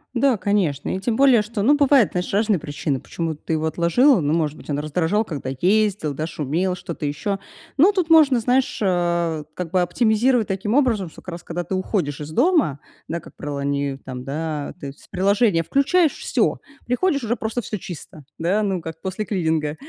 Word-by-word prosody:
Да, 250 -1 +3
конечно. 185 -8 0
И 190 - -3
тем 225 +2 -1
более, 265 -5 +6
что, 210 0 -4
ну, 280 +8 +5
бывают, 280 -6 +4
знаешь, 180 0 -3
разные 210 0 +2
причины, 145 -3 -3
почему 165 -2 -4
ты 155 - -8
его 160 0 0
отложила. 175 - +3
Ну, 145 0 0
может 155 -3 0
быть, - - -14
он 145 -1 -1
раздражал, 165 +8 0
когда 140 -8 -5
ездил, 200 -5 +2
да, 155 +3 -3
шумел, 165 +4 -1
что-то 170 -3 -6
ещё. 195 +8 -2 0.4
Ну, 335 +9 +6
тут 370 -5 -1
можно, 300 -6 +6
знаешь, 255 +3 +1
а, 170 -4 0
как 180 -3 -5
бы 185 -1 +3
оптимизировать 220 +5 +2
таким 195 +3 -2
образом, 235 - +2
что - - -15
как 185 - -8
раз 170 - -8
когда 175 +1 -4
ты 190 - -2
уходишь 180 -7 -2
из 150 +1 -7
дома, 265 - +2 0.3
да, 170 - -2
как - - -15
правило, 145 -1 -5
они 140 -1 -1
там, 125 -1 -6
да, 150 +1 -4
то 140 - -6
есть 140 - -10
с - - -17
приложения 200 -1 +2
включаешь, 300 - +2
всё, - - 0 0.3
приходишь- 280 +2 0
уже 230 +1 0
просто 225 0 -3
всё 215 - -5
чисто, 160 -4 -9 0.2
да, 190 +6 +1
ну, 190 -3 -1
как 160 0 -8
после 190 +3 -3
клининга. 160 -6 -1
185 Hz, 200 wpm, -22 LUFS, 155-225 Hz, 0.4 s, более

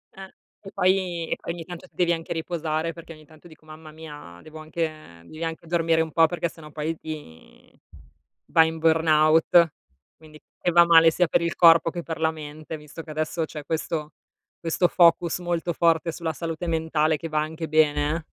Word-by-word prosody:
Eh. 190 0 -11 0.3
E 195 - -9
poi 180 -3 0
e - - 0
poi - - -6
ogni 170 -2 -8
tanto 175 0 -10
ti - - -36
devi 175 -1 +2
anche 165 0 -6
riposare 165 -1 -3
perché 165 0 -12
ogni 155 0 -17
tanto 155 +2 -18
dico: 155 0 -19
"Mamma 155 0 -12
mia, 150 - -11
devo 155 0 -12
anche 155 - -6
devi 155 - -9
anche 165 0 -5
dormire 165 -1 +1
un 160 - -3
po' 165 +2 +5
perché 170 -1 -2
sennò 150 -2 -14
poi 155 +2 -3
vi 150 - -11 0.7
vai 160 -1 +4
in 160 - -7
burnout." 160 +1 +4 0.4
Quindi 155 -1 -16 0.2
che 175 - +1
va 170 0 +6
male 165 -1 +6
sia 180 +1 +1
per 170 - +1
il 170 0 -2
corpo 165 -1 +6
che 175 +1 -5
per 160 -1 -6
la 160 0 +2
mente, 155 0 -8
visto 150 +2 -10
che 160 - -15
adesso 155 +2 -2
c'è 150 -1 -9
questo 155 -1 -3 0.5
questo 170 +2 +1
focus 170 -1 +3
molto 175 -1 -2
forte 165 0 +2
sulla 165 -2 -3
salute 165 +2 -5
mentale 160 -1 0
che 165 - -6
va 155 -1 -1
anche 160 +1 -5
bene, 150 -1 +2
eh. 165 -1 -6
160 Hz, 195 wpm, -24 LUFS, 155-170 Hz, 0.7 s, va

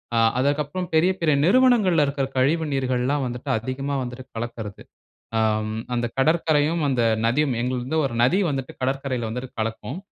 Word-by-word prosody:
ஆ. - - +3 0.2
அதற்கு 145 +3 +2
அப்புறம், 180 +5 -4
பெரிய, 175 +4 +4
பெரிய 155 -3 +3
நிறுவனங்கள்ல 205 - +4
இருக்குற 140 -1 -1
கழிவு 155 +5 +2
நீர்கள்லாம் 130 +1 0
வந்துட்டு 125 +3 -6
அதிகமா 135 +4 -3
வந்துட்டு 125 +1 -7
கலக்கிறது. 115 -3 -6 0.6
அம், 110 0 0
அந்த 120 0 0
கடற்கரையும், 155 +1 +2
அந்த 125 -3 +1 0.2
நதியும் 135 +2 +1
எங்கள்து 125 0 -2
வந்து 160 +3 0
1 120 - -5
நதி 155 +11 +4
வந்துட்டு 135 -2 -4
கடற்கரையில 130 -3 -1
வந்துட்டு 125 +2 -5
கலக்கும். 115 +8 -4
135 Hz, 155 wpm, -23 LUFS, 120-155 Hz, 0.6 s, பெரிய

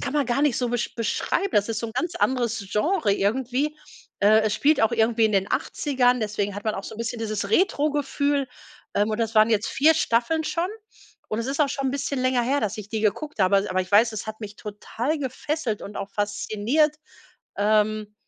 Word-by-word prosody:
kann 270 - -3
man 290 -3 +1
gar 245 +3 0
nicht 295 -4 +2
so 245 - 0
be 245 +1 -1 0.2
beschreiben, 245 - -1
das 205 +1 +2
ist 225 -1 -2
so 230 - -3
'n - - -9
ganz 330 +7 -2
anderes 235 -5 0
Genre 255 - +1
irgendwie. 255 +8 0 0.4
Äh, 215 +2 +6
es 215 -1 0
spielt 300 +2 +3
auch 225 +1 +3
irgendwie 225 0 +2
in 215 - +2
den 195 0 +1
80ern, 250 -4 +1
deswegen 205 -2 -2
hat 205 - -6
man 215 - 0
auch 195 - -6
so - - -7
'n - - -12
bisschen 230 +1 -3
dieses 215 -3 -3
Retrogefühl, 285 - +1 0.5
ähm, 205 +2 +2
und 215 - -2
das 225 -1 -1
waren 215 +1 +5
jetzt 215 -1 +2
4 315 +3 +4
Staffeln 310 +4 +1
schon 340 +3 -1 0.6
und 215 - -2
es 230 - -4
ist 280 +3 -2
auch 290 - +4
schon 275 -1 -2
'n - - 0
bisschen 280 0 -2
länger 255 -1 +2
her, 275 +4 +1
dass 215 +1 -2
ich 210 -1 -7
die 220 0 -3
geguckt 220 +5 -1
habe, 190 +1 +4
aber 195 - -2
aber 185 0 +1
ich 185 - -6
weiß, 225 +3 +5
es 215 - -5
hat 220 0 -6
mich 210 -2 -7
total 230 +7 -4
gefesselt 265 -3 -3
und 205 - -8
auch 200 0 -5
fasziniert, 215 +8 0 0.6
ähm, 210 0 +1
230 Hz, 220 wpm, -24 LUFS, 210-275 Hz, 0.6 s, Äh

